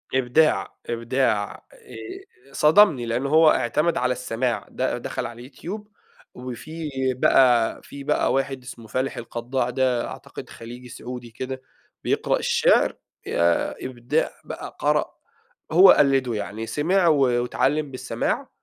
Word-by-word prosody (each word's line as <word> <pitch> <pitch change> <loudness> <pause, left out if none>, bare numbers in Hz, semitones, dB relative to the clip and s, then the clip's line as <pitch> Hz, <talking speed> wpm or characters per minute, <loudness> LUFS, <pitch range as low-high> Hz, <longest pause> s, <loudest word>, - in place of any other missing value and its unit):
إبداع، 130 +5 +2
إبداع 115 -2 0 0.2
آآ، 385 - -12
صدمني 155 - +5
لأن 120 +3 -1
هو 155 +2 +6
اعتمد 150 +8 +1
على 125 0 +1
السماع، 125 -3 -2
د - - -8 0.2
دخل - - -4
على 120 0 -8
اليوتيوب، 185 - -8 0.5
وفيه 140 +6 -7 0.2
بقى 125 -2 +3
في 140 0 -10
بقى - - +1
واحد 135 -1 -1
اسمه 115 -3 -10
فالح 130 +5 -2
القضاع 120 +2 -3
ده 125 -1 0
أعتقد - - -9
خليجي 120 +2 -10
سعودي 120 0 -8
كده 130 +2 -6 0.4
بيقرأ - - +1
الشِعر، - - +3 0.3
ياه 85 0 +1
إبداع 120 -2 -1
بقى، - - -8
قرأ، - - +1 0.6
هو 185 +4 +8
قلده 135 -4 +3
يعني 105 +2 -5
سمع 175 +7 +1
و 155 -3 +5
واتعلّم 135 +4 +1
بالسماع 130 - -3
130 Hz, 125 wpm, -23 LUFS, 120-150 Hz, 0.6 s, هو